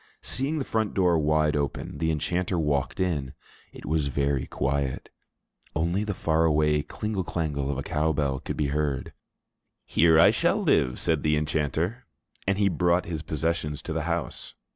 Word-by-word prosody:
Seeing 140 +4 -1
the 140 - -2
front 110 -2 -1
door 90 -4 +3
wide 75 0 +2
open, 70 0 -3
the 80 0 +1
enchanter 85 +4 0
walked 75 -4 0
in. 75 -8 -1 0.4
It - - -11
was 75 -2 0
very 70 0 0
quiet. 70 0 -2 0.6
Only 85 +6 +1
the 105 -2 -3
far 80 -1 +1
away 75 -1 +3
klingle 105 +4 -3
klangle 75 -5 -2
of 70 - -1
a 70 - -3
cow 75 +4 0
bell 70 -3 0
could - - -5
be 75 -2 0
heard. 75 -3 -1 0.7
"Here 80 0 +5
shall - - +1
I - - -3
live," 65 - +2
said 80 -4 +1
the 75 0 +2
enchanter. 80 - -1 0.4
And 100 0 +2
he 100 -1 +3
brought 90 0 +2
his 80 -3 -4
possessions 75 -1 -2
to - - -4
the - - -2
house. - - -3
80 Hz, 170 wpm, -26 LUFS, 75-85 Hz, 0.7 s, Here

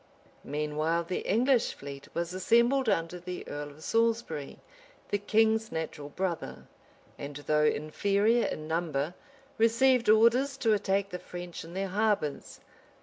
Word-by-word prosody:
] - - -30
Meanwhile 150 +3 -1
the 180 +2 -3
English 245 +4 +2
fleet 140 0 -9
was 170 +1 -2
assembled 235 +7 +3
under 165 0 -1
the 180 +1 -7
earl 145 0 -5
of 150 +2 -14
Saltsbury, 225 -11 0 0.5
the 205 - 0
king's 220 +2 +2
natural 155 -3 -5
brother; 180 +1 -4 0.5
and, 140 0 -6
though 150 +1 +1
inferior 200 +10 +2
in 155 0 -5
number, 160 -1 -1 0.5
received 235 +1 +4
orders 240 +6 +4
to 225 -4 +2
attack 200 -1 0
the 180 - -4
French 175 -1 -8
in 165 +2 -11
their 195 0 -2
harbors. 205 -7 -1
185 Hz, 140 wpm, -29 LUFS, 155-225 Hz, 0.5 s, received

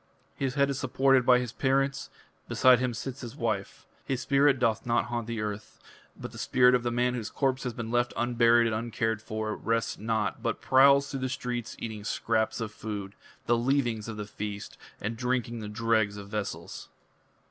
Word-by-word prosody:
His 135 -1 -2
head 140 -1 +3
is 140 - -3
supported 130 -1 +3
by 125 - +7
his 125 -2 -3
parents: 135 +1 0 0.4
beside 130 -1 +5
him 125 -1 0
sits 125 +4 -6
his 120 -3 -7
wife. 110 -4 -3 0.2
His 130 -2 -2
spirit 140 +1 +3
doth 115 -4 +1
not 120 0 +1
haunt 120 -1 -2
the 115 -1 -3
earth. 105 0 -6 0.4
But - - -7
the - - -10
spirit 125 0 +4
of 125 - +3
that 120 - -1
man 125 +1 +1
whose 115 -4 -4
corpse 135 -1 -1
has 125 - -2
been 115 -1 -5
left 120 0 +1
unburied 120 0 +4
and 110 -1 0
uncared 110 -1 -1
for, 110 -1 -3
rests 115 0 -1
not, 110 0 -1
but - - -2
prowls 140 +1 +5
through 135 - -3
the 130 0 -2
streets 125 -3 -4
eating 110 -2 -6
scraps 110 +1 0
of 110 -2 -4
food, 105 -3 -6 0.3
the 120 - +3
leavings 120 -3 0
of 110 -1 -6
the 105 - -4
feast, 105 0 -6 0.2
and 110 +3 -3
drinking 120 -1 -1
the 105 -1 -6
dregs 110 -1 +1
of 100 -1 -9
vessels." 105 -1 -5
120 Hz, 190 wpm, -28 LUFS, 110-130 Hz, 0.4 s, by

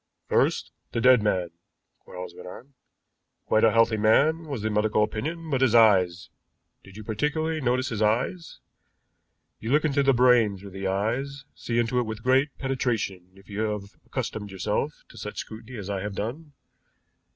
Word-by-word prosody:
"First, - - +1 0.2
the - - 0
dead 125 -1 +6
man," 95 -5 0 0.5
Quarles 90 -1 -9
went 90 - -11
on. 125 +9 -11 0.7
"Quite 110 - +2
a 115 - +6
healthy 115 0 +3
man 150 +10 +3
was 135 -8 -4
the 110 - 0
medical 105 0 +2
opinion 160 +10 -4
but 135 -2 +1
his 125 -3 +4
eyes. 95 -6 +4 0.5
Did 95 +1 -14
you 110 - -8
particularly 155 +8 -1
notice 130 +1 +1
his 110 -2 -3
eyes? 125 +11 0 1.0
You 110 - -5
look 150 +2 +3
into 140 -2 +2
the 135 0 +4
brain 120 -5 +4
through 100 +1 -11
the 95 +1 -4
eyes, 125 +8 -2
see 115 - -3
into 120 +1 +1
it 120 - -1
with 110 0 -6
great 130 +3 +3
penetration 115 -9 -2
if 95 0 -19
you 105 0 -6
have 105 -2 -3
accustomed 110 -5 -4
yourself 95 -2 -2
to - - -13
such - - -7
scrutiny 110 +3 -8
as 100 -3 -6
I 100 -2 -2
have 105 0 -5
done. 140 +10 -5
110 Hz, 175 wpm, -26 LUFS, 105-130 Hz, 1.0 s, dead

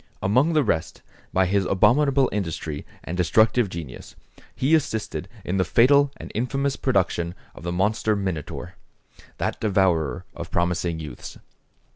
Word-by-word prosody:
Among 130 +12 +3
the 155 -2 +4
rest, 80 -7 -2 0.3
by 95 0 +3
his 100 +2 +1
abominable 130 +8 +3
industry 80 -6 -4 0.2
and 90 - -5
destructive 110 +5 +3
genius, 80 -8 -8 0.4
he 135 +5 +1
assisted 110 - 0 0.2
in 95 - -1
the 95 - +3
fatal 140 - +4
and - - -9
infamous 135 +4 -1
production 90 -8 0 0.2
of - - -12
the 85 +1 -3
monster 105 +4 +1
Minotaur, 95 -7 -4 0.6
that - - -2
devourer 90 - +1
of - - -7
promising 85 -1 0
youths. 75 -6 -8
95 Hz, 135 wpm, -24 LUFS, 85-125 Hz, 0.6 s, the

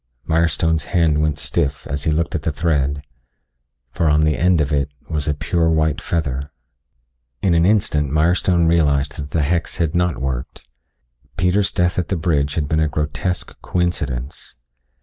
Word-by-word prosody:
Mirestone's 80 -1 +1
hand 80 -4 +2
went 75 -1 0
stiff 70 0 -2
as 70 0 -4
he 80 - +2
looked 80 +2 0
at 80 - -1
the 80 - -1
thread, 70 -3 0 0.9
for 80 +4 +1
on 75 +1 +3
the 75 -1 +2
end 90 0 +3
of 75 -1 0
it 70 -1 +1 0.2
was 75 -2 -2
a 75 - +1
pure 80 +2 0
white 80 -1 +1
feather. 70 -4 -2 0.9
In 95 - +3
an 85 +1 +4
instant 75 -9 +1
Mirestone 85 +2 +2
realized 75 -3 +2
that 70 -1 -6
the 75 0 0
hex 85 +3 -1
had 80 -3 0
not 90 -2 +1
worked. 65 0 -5 0.7
Peter's 90 +3 +2
death 90 0 +1
at 90 - -2
the 95 - -1
bridge 75 -4 0
had 75 -3 -1
been 80 +1 +1
a 80 - +2
grotesque 75 +4 -3
coincidence. 75 -7 -3
80 Hz, 170 wpm, -20 LUFS, 75-85 Hz, 0.9 s, an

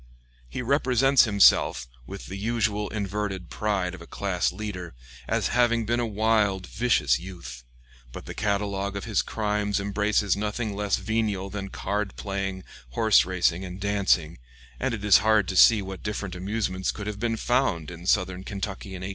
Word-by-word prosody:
He 125 - -4
represents 135 0 +4
himself, 100 - +4 0.2
with 100 0 -8
the 95 - -7
usual 105 0 -1
inverted 100 -4 -4
pride 100 -4 -1
of 90 - -10
a 85 - -11
class 95 -3 -1
leader, 90 - -6 0.3
as - - 0
having 120 -2 +2
been 120 +2 0
a 120 - 0
wild, 105 -3 +1
vicious 85 - +1
youth; 80 -9 -9 0.5
but - - -9
the - - -7
catalogue 100 -1 -1
of 100 - -4
his 110 -3 +1
crimes 105 -2 -1
embraces 100 0 +1
nothing 105 +1 -3
less 105 0 0
venial 105 -4 -2
than 100 -1 -5
card 100 0 -3
playing, 95 -1 -4 0.3
horse 110 -7 +4
racing, 90 -1 0
and 90 0 -7
dancing, 95 -6 +1 0.4
and 115 - -1
it 105 -2 -7
is 105 - +7
hard 110 -3 +3
to 95 - -3
see 105 +2 +7
what 95 0 -7
different 105 -3 -4
amusements 95 0 -2
could 105 - -7
have 105 -1 -5
been 115 0 -1
found 110 - 0
in 85 +1 -9
southern 95 -2 +1
Kentucky 95 -1 -5
in 90 - -7
1801. 95 - -4
100 Hz, 170 wpm, -26 LUFS, 95-110 Hz, 0.5 s, is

